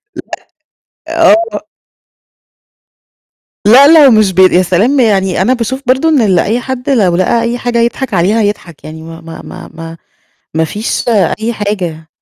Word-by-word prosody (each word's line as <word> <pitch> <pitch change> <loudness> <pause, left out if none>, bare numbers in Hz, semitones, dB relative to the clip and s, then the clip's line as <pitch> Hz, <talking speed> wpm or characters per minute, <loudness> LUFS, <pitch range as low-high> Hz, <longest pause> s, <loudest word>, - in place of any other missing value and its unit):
لأ. - - -8 0.9
آه. 330 +4 +1 2.0
لأ، 260 +7 +6 0.2
لو 265 - +5
مش 215 -4 +2
ب 190 - -2
يا 185 -1 +4
سلام! 200 +10 0
يعني 195 -6 +1
أنا 245 +7 +1
باشوف 260 +3 -4
برضه 265 +6 +1
إن 290 -6 +2
ال 190 -5 +1
أي 225 +8 -1
حد 255 0 -6
لو 200 -10 +1
لقى 185 +6 0
أي 235 +1 -2
حاجة 240 -1 -2
يضحك 235 0 -2
عليها 195 +6 +1
يضحك 195 -6 -5
يعني 160 +1 -10
ما 165 +1 -11
ما 165 0 -11
ما - - -11
ما 165 0 -10 0.6
ما 160 0 0
فيش 210 +8 -4 0.3
أي 230 +2 -3
حاجة. 180 -7 -5
215 Hz, 155 wpm, -11 LUFS, 180-245 Hz, 2.0 s, لأ